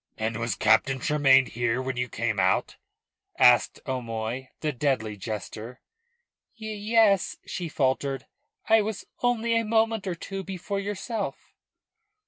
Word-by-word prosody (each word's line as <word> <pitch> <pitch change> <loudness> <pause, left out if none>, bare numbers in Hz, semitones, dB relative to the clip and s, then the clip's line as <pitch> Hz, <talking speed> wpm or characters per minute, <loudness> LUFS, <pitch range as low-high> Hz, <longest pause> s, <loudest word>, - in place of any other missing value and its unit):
"And 110 0 -2
was 115 0 -1
Captain 135 -1 +3
Tremayne 135 -2 +4
here 120 0 -1
when 130 0 -3
you 125 0 -2
came 110 -2 -1
out?" 95 0 +1 0.6
asked - - +5
O'Moy, 120 0 -3
the 155 - 0
deadly 125 -6 -1
jester. 110 +3 -6 0.8
"Ye 220 0 -5
es," 205 -4 +4
she 175 -3 -4
faltered. 135 -1 0 0.4
"I 225 0 +6
was 210 -1 -4 0.2
only 235 -1 +1
a 230 - +2
moment 225 -2 +1
or 180 - -1
two 195 +3 -6
before 195 +1 -4
yourself." 205 +2 -4
140 Hz, 130 wpm, -26 LUFS, -, 0.8 s, I